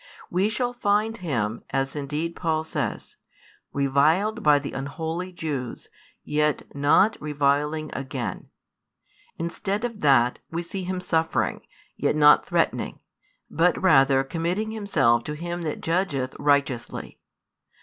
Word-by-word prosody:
We 190 +4 +2
shall 245 +3 -1
find 215 -1 +1
Him, 115 - -2
as 135 +1 -1
indeed 150 +4 -3
Paul 160 -2 0
says, 150 -7 -4 0.5
reviled 155 - +2
by 150 -1 +5
the 140 0 -4
unholy 160 +6 -4
Jews, 145 -8 -5 0.3
yet 150 0 0
not 145 +10 +4
reviling 150 +1 0
again; 130 -7 -5 0.9
instead 195 +6 -2
of 230 -3 -5
that, 130 -4 +4
we 170 +1 -3
see 185 +2 -5
|289 - - -8
Him 185 -1 -2
suffering, 165 -2 0 0.4
yet - - +1
not 150 -1 +6
threatening, - - 0 0.5
but 170 +3 +2
rather 135 -6 +5
committing 175 +9 -2
Himself 145 - +2
to 150 - -3
Him 175 +3 -4
that 155 -3 -4
judgeth 160 -7 -1
righteously. 140 -4 0
155 Hz, 125 wpm, -25 LUFS, 140-180 Hz, 0.9 s, not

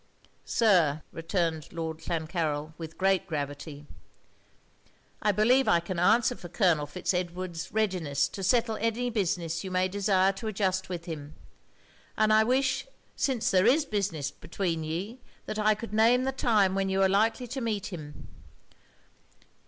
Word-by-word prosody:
'Sir,' 170 -10 +3
returned 165 -2 -2
Lord 160 -1 -4
Clancarryl 160 -2 -2
with 165 -1 -8
great 190 0 +2
gravity, 145 -1 -5 1.4
'I 210 - +3
believe 245 +6 +3
I 170 - +5
can 170 +1 -4
answer 225 +7 +3
for 175 - -10
Colonel 170 -6 +2
Fitz 180 +5 -2
Edward's 180 -1 -4
readiness 180 -10 0
to 195 - -7
settle 225 +3 +2
any 230 +2 -1
business 175 -6 -1
you 190 - -5
may 185 0 +1
desire 195 0 +2
to 195 +3 -6
adjust 190 -3 -1
with 175 -2 -5
him; 155 -3 -7 0.8
and 215 0 +4
I 215 0 +6
wish, 260 - +1 0.3
since 265 -5 0
there 185 +2 +4
is 290 +5 +4
business 195 - -2
between 170 -2 -3
ye, 190 +11 -5 0.2
that 215 - -4
I 215 0 +3
could 220 0 -8
name 230 +4 +4
the 265 - 0
time 215 -7 +2
when 195 0 0
you 190 0 +2
are - - +5
likely 220 +5 +1
to 265 +2 -4
meet 210 -4 -3
him. 150 -3 -9
190 Hz, 155 wpm, -28 LUFS, 165-220 Hz, 1.4 s, I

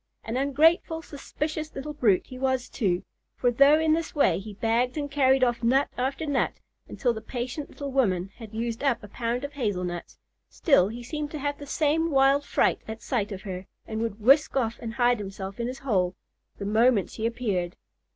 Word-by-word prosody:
An 225 - -4
ungrateful, 320 +4 +3
suspicious 310 +2 -5
little 295 +3 -5
brute 220 -10 +2
he 255 - -10
was 260 -1 0
too; 185 -7 0 0.3
for 245 - +2
though 280 +5 +6
in 320 -1 +3
this 325 0 -2
way 190 - +3
he 205 +1 -9
bagged 235 +5 +1
and 285 -1 -3
carried 265 -2 +4
off 240 -2 +1
nut 260 +4 +3
after 270 +4 -2
nut, 285 -3 +1 0.4
until 245 -3 0
the 220 - -6
patient 250 +5 -5
little 280 -1 -6
woman 195 -8 +1
had 225 -4 -10
used 230 +2 -3
up 270 -6 +1
a - - -8
pound 235 +4 -2
of 285 +1 -5
hazel 210 -10 -1
nuts, 175 -1 -5 0.3
still 275 - +3
he 235 +3 -7
seemed 300 +3 -4
to 305 - -5
have 285 0 -3
the 285 - -9
same 315 +3 +1
wild 275 0 +4
fright - - +1
at 220 +1 -7
sight 215 -5 -1
of 195 -1 -6
her, 185 -1 -6 0.2
and 220 0 -4
would 225 -2 -3
whisk 275 +6 +4
off 230 -3 0
and 230 -1 -6
hide 245 -1 +3
himself 195 +1 -6
in 235 - -1
his 255 +1 -5
hole 185 -7 +1 0.4
the 200 - -5
moment 220 0 +3
she 220 - -2
appeared. 205 -7 -2
245 Hz, 200 wpm, -26 LUFS, 220-280 Hz, 0.4 s, though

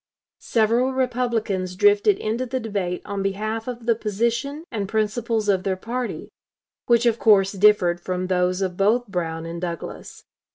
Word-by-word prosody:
Several 235 +3 +1
Republicans 230 -8 -1
drifted 205 +1 +4
into 235 +4 -2
the 260 +2 -2
debate 200 -6 -3
on 200 -1 -3
behalf 215 +4 -2
of 240 -2 -6
the 230 - +4
position 235 +8 -2
and 200 -3 -3
principles 220 0 -1
of 195 -2 +2
their 190 0 -1
party, 240 +5 -5 0.6
which 235 0 +4
of 235 -1 +2
course 195 -3 +5
differed 190 -4 +3
from 185 0 -3
those 180 +1 +1
of 180 -1 -3
both 220 +5 +2
Brown 165 -5 -3
and 170 +1 -6
Douglas. 170 -2 -6
210 Hz, 155 wpm, -23 LUFS, 185-235 Hz, 0.6 s, course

